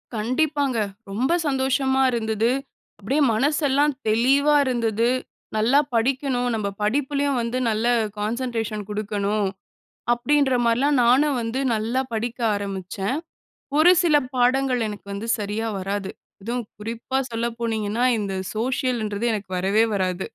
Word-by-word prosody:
கண்டிப்பாங்க! 275 +3 0 0.3
ரொம்ப 250 +10 0 0.2
சந்தோஷமா 265 -1 +1
இருந்தது. 225 -1 0 0.5
அப்டியே 265 +9 0
மனசெல்லாம் 285 +3 +2
தெளிவா 270 +7 +3
இருந்தது. 230 -2 +1 0.5
நல்லா 245 +7 +4 0.2
படிக்கணும். 255 +1 +1
நம்ப 210 -2 -1
படிப்புலையும் 280 +4 0
வந்து 235 +2 -2
நல்ல 220 +2 0 0.3
கான்சன்ட்ரேஷன் 225 -1 -2
குடுக்கணும். 205 0 -1 0.7
அப்பிடின்ற 270 +2 +2
மாரிலாம், 265 +5 +2
நானும் 265 +3 +4
வந்து 230 +3 -2
நல்லா 225 +4 0
படிக்க 230 +2 -3 0.2
ஆரம்பிச்சேன். 195 +4 -3 0.6
ஒரு 345 +3 +7
சில 320 -4 +4 0.2
பாடங்கள், 255 +1 +2
எனக்கு 205 -1 -8
வந்து 205 +3 -5
சரியா 210 +2 -2
வராது. 195 +1 -3 0.3
அதுவும் 235 +2 -3
குறிப்பா 230 +4 -3
சொல்ல 230 +1 -1
போனீங்கன்னா, 225 0 -1
இந்த 200 -2 -3 0.2
சோஷியலுன்றது 235 -2 -1
எனக்கு 200 -3 -5
வரவே 205 +5 +3
வராது. 185 -1 -1
235 Hz, 115 wpm, -23 LUFS, 215-265 Hz, 0.7 s, ஒரு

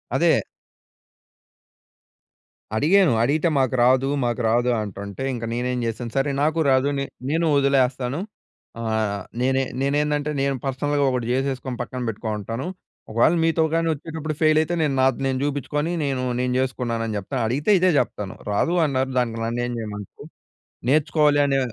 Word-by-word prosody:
అదే - - +4 2.4
అడిగాను. 170 - +4
అడిగితే 155 +5 +2
మాకు 130 -1 +1
రాదు, 130 +2 +4 0.2
మాకు 120 +1 -1
రాదు 120 +2 +2
అంటుంటే 100 +4 -6
ఇంక 115 - -5
నేనేం 125 +1 -1
చేసాను. 115 +1 -4
సరే 135 +1 +2
నాకు 155 +2 +1
రాదు. 130 +1 +3
నే 140 - -1 0.2
నేను 165 +3 +1
వదిలేస్తాను. 135 0 +1 0.6
ఆహ్, 110 -3 -1 0.2
నేనే 130 +1 +2 0.2
నేనేందంటే 145 +1 0
నేను 140 0 +1
పర్సనల్‌గా 145 +2 0
ఒకటి 125 -2 -1
జేసేసుకొని 130 -1 -2
పక్కన 125 +1 -5
పెట్టుకొని 110 0 -3
ఉంటాను. 115 - -4 0.4
ఒకవేళ 120 +9 +3
మీతో 165 0 +2
గాని 165 0 +1
వచ్చేటప్పుడు 155 0 -5
ఫెయిల్ 155 -1 +4
అయితే, 170 +2 -2
నేను 150 -3 +1
నాది 130 -2 +2
నేను 130 -1 -1
చూపించుకొని 145 +2 -1
నేను 135 -3 -1 0.2
నేను 125 0 0
జేసుకున్నానని 115 -4 -2
జెప్తా. 100 +7 -5
అడిగితే 145 - +1
ఇదే 185 +1 +4
జెప్తాను 100 -2 -2 0.2
రాదు 165 +12 +1
అన్నారు 130 -2 0
దానికి 115 -2 -1
నన్నేం 120 +1 -2
జేయమంటారు, 105 -3 -7 0.6
నేర్చుకోవాలి 150 0 +3
అనే 135 -1 +2
130 Hz, 140 wpm, -23 LUFS, 120-145 Hz, 2.4 s, అదే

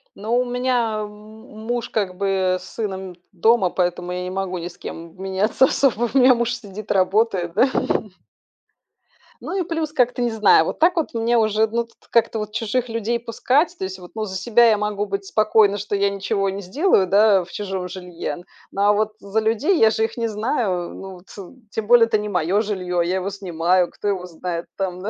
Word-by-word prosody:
Ну, 230 +5 0
меня, 245 -3 0
м, 210 - -5 0.6
муж, 240 -1 -2
как 190 -4 -2
бы, 190 -2 +1
с 180 - -13
сыном 190 -4 -4 0.2
дома, 200 +1 +3
поэтому 180 0 -2
я 180 - -3
не 180 - -4
могу 185 -1 -3
ни 170 - -5
с 175 - -12
кем, 165 +1 -8
м, 185 - -15
меняться 195 +6 +2
особо. 245 -4 +1
У - - +3
меня 255 0 +7
муж 235 0 -1
сидит, 215 -2 -8
работает, 190 -2 +1
да. 245 +8 +4 1.7
Ну, - - -5
и - - +1
плюс 320 -2 -3
как-то, 250 -1 +1
не 240 - 0
знаю, 210 -7 +5
вот - - -4
так 345 +3 +4
вот 330 -3 -1
мне 230 +1 +1
уже, 215 0 +2
ну, 235 +2 -1
тут 230 - -25
как-то 230 -1 +2
вот 210 0 -5
чужих 235 +2 -1
людей 230 +1 -1
пускать. 270 +9 0
То - - -6
есть 190 0 -5
вот, 180 -1 -12
ну, 220 -1 -2
за 190 - -6
себя 235 +5 +4
я 215 - +3
могу 210 0 -2
быть 195 -1 -4
спокойна, 210 0 +3
что 205 +1 -3
я 200 0 +2
ничего 195 0 -1
не 195 +1 -5
сделаю, 200 - +2
да, 200 0 +4
в 175 - -15
чужом 190 -3 -4
жилье, 180 -5 -6 0.3
но, 200 +1 +1
а - - +5
вот 215 +1 0
за 200 +1 -1
людей, 230 - +1
я 220 -1 +5
же 220 - +1
их 225 - -7
не 230 -1 0
знаю, 210 -5 -1
ну 190 0 -8
вот. - - -47 0.4
Тем 220 -2 -4
более, 240 -1 +7
это 225 -1 +2
не 210 0 -4
моё 180 +2 +1
жильё, 185 -5 -2
я 175 +2 0
его 190 +1 -2
снимаю, 180 -2 0
кто - - -6
его 190 -3 -1
знает 170 0 -5
там, 185 -2 -3
да? 210 - -3
210 Hz, 210 wpm, -21 LUFS, 185-230 Hz, 1.7 s, меня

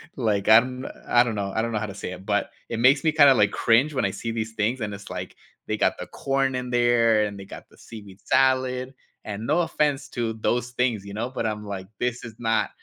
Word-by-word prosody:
like, 105 -6 0
I 110 - +10
n 125 +2 -1 0.2
I 120 - +5
don't 120 -3 -3
know 100 -1 -3
I 110 - +2
don't 115 +1 -2
know 110 - -1
how 105 - -3
to 100 - -7
say 100 -2 -6
it, 95 +1 -11
but 105 0 0 0.2
it 115 - -4
makes 130 +3 +5
me 160 - +3
kinda 145 -3 +7
like 105 -2 +3
cringe 130 +7 +2
when 130 -6 0
I 100 - 0
see 115 +4 -5
these 110 0 -4
things, 110 +4 -1
and 105 -2 -3
it's 100 0 -10
like, - - -6 0.3
they - - -1
got - - +1
the - - -6
corn 135 -1 -1
in 125 -1 -4
there 120 -2 +3
and 100 -1 -6
they 100 - -9
got - - -11
the - - -22
seaweed 100 -4 -12
salad 130 0 +1 0.3
and 105 +1 -6
no 150 +7 +2
offense 150 -4 -1
to 115 -3 -2
those 120 +2 -1
things, 120 -5 -1
you 100 - -8
know, 115 +4 -3
but 130 -3 -4
I'm 105 -1 -3
like, 95 -2 -6
"This 125 0 -2
is 115 -2 -8
not 115 -2 +1
115 Hz, 255 wpm, -24 LUFS, 105-130 Hz, 0.3 s, I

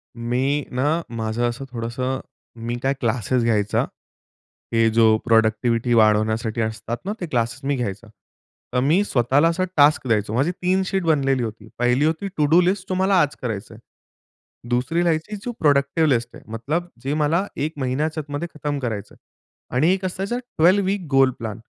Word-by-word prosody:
मी 130 +5 -1
ना, 145 +7 +1
माझं 115 +1 -1
असं 120 +3 -6
थोडंसं 125 +3 -3 0.5
मी 120 +1 -2
काय 135 +1 +2
क्लासेस 120 0 0
घ्यायचा. 105 -3 +1 0.9
हे 115 0 +4
जो 110 -1 +4
प्रॉडक्टिव्हिटी 115 +1 +2
वाढवण्यासाठी 110 +1 +2
असतात 110 +1 -3
ना, 205 - -1
ते - - -1
क्लासेस 120 -2 -1
मी 140 0 +1
घ्यायचा. 115 -3 -4 0.7
तर 125 - +2
मी 165 +9 +3
स्वतःला 135 - +3
असा 170 +2 0
टास्क 145 -2 +4
द्यायचो. 105 -2 +1
माझी 135 +9 +1
3 185 +1 0
शीट 190 0 -1
बनलेली 135 -5 +2
होती. 110 -1 -6
पहिली 125 +4 +3
होती 160 +5 -1
टू 150 - +3
डू 170 +2 +7
लिस्ट 185 +1 0
तुम्हाला 190 +1 +2
आज 145 0 0
करायचं 115 -1 -4
आहे. 110 - -13 0.9
दुसरी 125 +8 +1
राहायची, 165 +4 0
जी 210 +4 -5
प्रॉडक्टिव्ह 145 +2 +3
लिस्ट 120 -3 0
ये, - - -12
मतलब 150 +10 -2
जे 135 +2 -1
मला 155 +5 +1 0.2
1 155 - -4
महिन्याच्या 150 +5 -1
आतमध्ये 145 +3 -4
खतम 145 -1 -3
करायचं 110 -6 -4
आहे. - - -24 0.6
आणि 160 +8 +4
एक 190 0 -3
असायचा 195 +5 -2
ट्वेल्व 200 -5 +2
वीक 195 -1 -1
गोल 135 -1 +5
प्लॅन. 110 -2 -5
135 Hz, 170 wpm, -22 LUFS, 115-160 Hz, 0.9 s, डू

